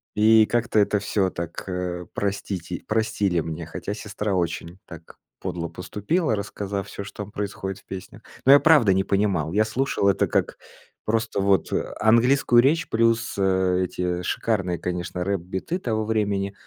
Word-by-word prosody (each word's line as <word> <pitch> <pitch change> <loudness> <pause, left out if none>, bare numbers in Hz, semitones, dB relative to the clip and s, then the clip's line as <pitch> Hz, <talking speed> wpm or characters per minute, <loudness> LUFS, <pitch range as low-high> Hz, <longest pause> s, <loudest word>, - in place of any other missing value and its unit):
И 110 +1 +6
как-то 120 -1 +1
это 105 0 +2
всё 100 -1 0
так, 85 -2 -6
э, 90 -1 -3
простите 95 -4 -3
простили 105 -5 +1
мне, 80 +1 -5
хотя 80 +5 -5
сестра 105 -1 -4
очень 85 0 -2
так 85 -1 -12 0.2
подло 85 -3 -4
поступила, 105 - -1
рассказав 100 -1 -4
всё, 100 - -7
что 105 +1 -7
там 100 - -12
происходит 100 -1 -4
в - - -25
песнях. 95 -1 -9 0.2
Но 135 - +7
я 140 - +9
правда 145 - +5
не 95 +1 +2
понимал. 95 -6 0
Я 110 +1 +4
слушал 110 -2 0
это 95 - +2
как - - 0 0.5
просто 110 -1 0
вот 95 -4 +2 0.3
английскую 120 +2 +5
речь 155 +6 +2
плюс 115 0 +1
эти 90 -2 0
шикарные, 95 -6 -1
конечно, 90 0 -3
рэп-биты 95 - -3
того 110 -9 -1
времени. 100 -3 0
100 Hz, 150 wpm, -24 LUFS, 90-110 Hz, 0.5 s, я